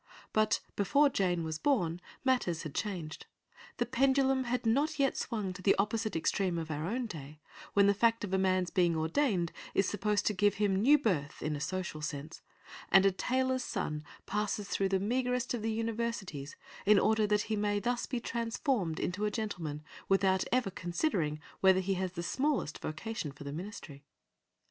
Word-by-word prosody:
But 215 0 +2
before 280 +9 +4
Jane 180 -8 0
was 160 -1 -3
born, 180 - +1 0.2
matters 215 -11 +1
had 155 -4 -6
changed. 175 -7 -4 0.5
The 240 - +1
pendulum 265 +1 +2
had 245 0 -1
not 285 +7 +2
yet 275 -2 +2
swung 210 -6 -2
to 185 - -10
the 195 - +4
opposite 215 +2 0
extreme 175 +2 0
of 160 -1 -4
our 155 +2 -2
own 245 +5 -1
day, 150 -7 -8 0.4
when 200 0 +6
the 200 - +5
fact 230 +2 +2
of 195 -2 -4
a 190 - +3
man's 185 -1 +1
being 175 -2 +3
ordained 170 - +1 0.2
is 195 - +3
supposed 205 0 0
to 210 - +2
give 205 +1 +2
him 200 -1 +1
new 255 +10 +6
birth 170 - -1
in 155 0 -1
a - - -4
social 175 -1 -3
sense, 150 +1 -5 0.5
and 195 +1 +7
a 195 - +5
tailor's 255 +5 0
son 150 -8 -3 0.2
passes 210 0 -2
through 195 0 0
the 190 0 +2
meagrest 250 +4 0
of 240 - -2
the 225 +1 -1
Universities 220 -10 -3 0.3
in 210 +1 +6
order 215 +1 +3
that 210 0 +2
he 220 +1 -2
may 205 0 +1
thus 240 +3 -1
be 250 - -2
transformed 230 - -1
into 195 +4 -1
a - - +2
gentleman 175 -9 -4 0.3
without 195 -1 +3
ever 250 -5 +1
considering 175 - -1 0.2
whether 190 -1 +5
he 190 +1 0
has 185 -1 -2
the 170 - -4
smallest 265 - -1
vocation 155 0 -4
for 140 +1 -11
the 140 0 -5
ministry. 160 -5 -8
200 Hz, 180 wpm, -32 LUFS, 170-230 Hz, 0.5 s, and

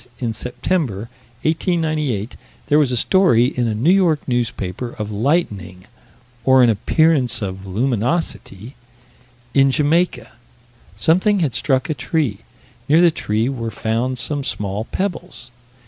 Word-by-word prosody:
In 115 -3 -2
September, 120 - -2 0.3
1898, 155 - -1 0.3
there 150 - +3
was 140 -4 +2
a 125 - 0
story 175 - +4
in 125 -2 -1
a 110 - -1
New 130 +11 +3
York 175 -6 +2
newspaper, 120 -3 -3
of 105 0 -4
lightning 105 - -1 0.6
or 130 -1 +5
an 120 - +5
appearance 130 +2 +2
of 95 0 -6
luminosity? 120 - -2 0.8
in 135 -1 +4
Jamaica 155 +6 +1 0.6
something 185 - +2
had 145 -7 0
struck 130 -2 0
a 155 - -1
tree: 145 -9 -2 0.5
near 155 +3 +5
the 175 -1 +5
tree 110 -5 -1
were 120 -4 -3
found 115 +4 -2
some 140 +4 -2
small 105 -2 -3
pebbles. 180 -9 -5
125 Hz, 130 wpm, -19 LUFS, 110-155 Hz, 0.8 s, or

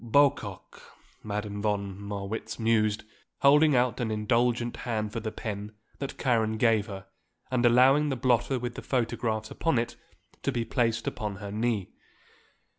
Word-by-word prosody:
"Bocock," 140 +4 +1 0.4
Madame 105 -1 -4
von 100 -2 -1
Marwitz 100 +1 -5
mused, 110 -2 +2 0.4
holding 145 +1 +6
out 125 -1 +2
an 120 -2 -1
indulgent 120 +2 +1
hand 110 -3 -3
for 115 - -2
the 110 -1 -4
pen 105 -1 -5 0.3
that 140 - -5
Karen 110 -3 +1
gave 110 -2 +3
her 95 -2 -7 0.5
and 125 -2 +1
allowing 135 +5 +5
the 135 - 0
blotter 125 +1 +2
with 120 -1 -4
the - - -7
photographs 115 -3 -1
upon 165 -6 0
it 115 +1 -1 0.5
to 140 - 0
be 120 -3 -1
placed 115 0 0
upon 105 -4 -3
her 100 0 -7
knee. 110 -2 -1
115 Hz, 150 wpm, -28 LUFS, 105-125 Hz, 0.5 s, holding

